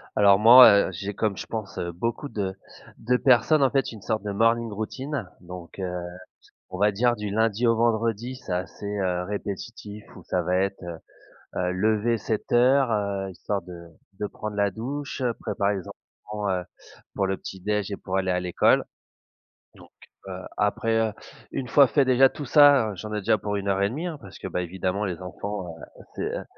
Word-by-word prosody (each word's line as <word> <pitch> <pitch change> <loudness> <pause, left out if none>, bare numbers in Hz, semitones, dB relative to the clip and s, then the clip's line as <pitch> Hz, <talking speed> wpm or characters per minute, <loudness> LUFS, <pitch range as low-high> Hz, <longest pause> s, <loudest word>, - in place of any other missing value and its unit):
Alors, 100 -1 +6
moi, 115 -2 +9
heu, - - -7
j'ai, 100 +3 -5
comme 105 -2 -1
je - - -5
pense, 110 -4 -6
heu, 85 - -3
beaucoup 115 - -3
de 95 -3 -3 0.4
de 125 +3 0
personnes, 140 +4 +4
en 135 - +4
fait, 135 -2 0
une 110 -3 -11
sorte 110 +1 -2
de 105 - -3
morning 115 +2 +2
routine 115 +1 -4
donc, 90 +1 -10
heu, 90 -1 -4 0.6
on 95 - -6
va 105 +1 +4
dire, 120 +4 +2
du 105 -2 -4
lundi 110 +2 +1
au 115 -1 +4
vendredi. 115 +1 0
C'est 110 - -7
assez, 90 +3 -4
heu, 90 -2 0
répétitif, 105 +1 -6
où - - -11
ça 90 -1 -1
va 90 +2 0
être, 95 +1 -1
heu 85 -1 -6 0.6
heu, 90 0 0
lever 110 +4 +1
07:00, 125 +4 +2
heu, 100 -2 -1
histoire 100 +2 -3
de 85 -1 -11 0.3
de 105 - -1
prendre 105 +1 -6
la 100 -1 +1
douche, 140 +7 -5 0.2
préparer 100 -2 -1
les 95 - -6
enfants, 105 -1 -7
heu, 90 -1 0 0.5
pour 95 - +1
le 95 0 -1
petit 95 - -9
déjeuner 105 +1 -1
et 100 - -3
pour 95 +1 -3
aller 95 -1 0
à 90 - +1
l'école 90 -1 +3 0.9
donc - - -17 0.4
heu, - - -6 0.3
après, 115 +2 +1
heu, 110 -1 +1 0.4
une 130 - -4
fois 140 +2 +6
fait 140 +4 +3
déjà 130 +1 +6
tout 145 - -7
ça, 140 -4 +6
heu, - - -8
j'en 105 +4 -7
ai 105 - -1
déjà 105 +2 +2
pour 105 0 -3
1 100 0 -3
heure 100 0 +1
et 100 - +2
1/2, 155 +10 -4
hein, 160 - -5
parce 100 - -12
que, - - -5
bah, 90 - -2
évidemment, 95 +3 -2
les 90 -3 -4
enfants, 95 +1 -5
heu, - - -14
c'est, - - -3
heu - - -6
105 Hz, 200 wpm, -25 LUFS, 95-115 Hz, 0.9 s, moi